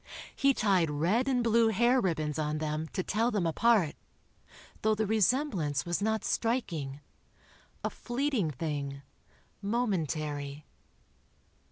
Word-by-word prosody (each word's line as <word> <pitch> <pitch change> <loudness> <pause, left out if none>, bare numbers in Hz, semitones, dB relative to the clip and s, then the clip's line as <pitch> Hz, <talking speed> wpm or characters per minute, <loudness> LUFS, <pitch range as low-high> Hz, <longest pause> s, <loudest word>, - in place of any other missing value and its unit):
He 275 -1 +3
tied 190 -6 +2
red 175 - +1
and 250 -3 +2
blue 230 0 +4
hair 240 +4 +3
ribbons 155 -5 -1
on 150 0 -1
them, 155 +1 -2
to 185 - -1
tell 225 +6 +1
them 205 -7 0
apart, 190 0 +3 0.9
though 220 0 +2
the 220 +1 0
resemblance 205 - +1
was 175 +2 -1
not 220 +1 0
striking... 165 - -1 0.8
a - - -1
fleeting 245 - -1
thing... 140 -1 -4 0.6
momentary. 155 - -2
190 Hz, 120 wpm, -30 LUFS, 155-230 Hz, 0.9 s, blue